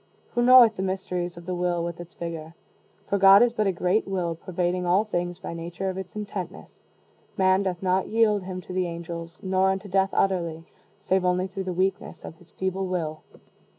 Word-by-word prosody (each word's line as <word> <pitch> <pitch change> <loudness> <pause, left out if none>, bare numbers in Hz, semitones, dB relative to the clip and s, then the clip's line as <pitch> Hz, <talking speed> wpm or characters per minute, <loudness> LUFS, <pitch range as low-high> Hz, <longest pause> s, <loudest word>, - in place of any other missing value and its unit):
Who 240 - +1
knoweth 240 -3 +7
the - - -2
mysteries 180 -2 -3
of 170 - -10
the 185 - -3
will, 175 -1 0
with 170 0 -5
its 175 0 -10
vigor? 165 -1 -6 0.5
For 200 - 0
God 195 +3 +8
is 240 -1 +2
but 215 -3 0
a - - +3
great 180 +4 0
will 180 -3 -1
pervading 180 +1 -2
all 180 +4 +3
things 175 -4 -3
by 180 - -7
nature 170 +3 -4
of 185 - -8
its 190 0 -9
intentness. 205 -3 -7 0.6
Man 190 0 +4
doth 185 -2 -3
not 185 0 +1
yield 215 -2 +2
him 185 0 -6
to 180 - -9
the 185 -1 0
angels, 170 0 -7
nor 190 0 +2
unto 190 +1 -2
death 195 0 +2
utterly, 170 -4 0 0.3
save 190 -1 +1
only 180 0 +1
through 190 0 -5
the 185 - -2
weakness 190 +3 -2
of 160 - -9
his 175 -1 -21
feeble 190 0 -3
will." 160 -4 -3
185 Hz, 200 wpm, -25 LUFS, 175-195 Hz, 0.6 s, God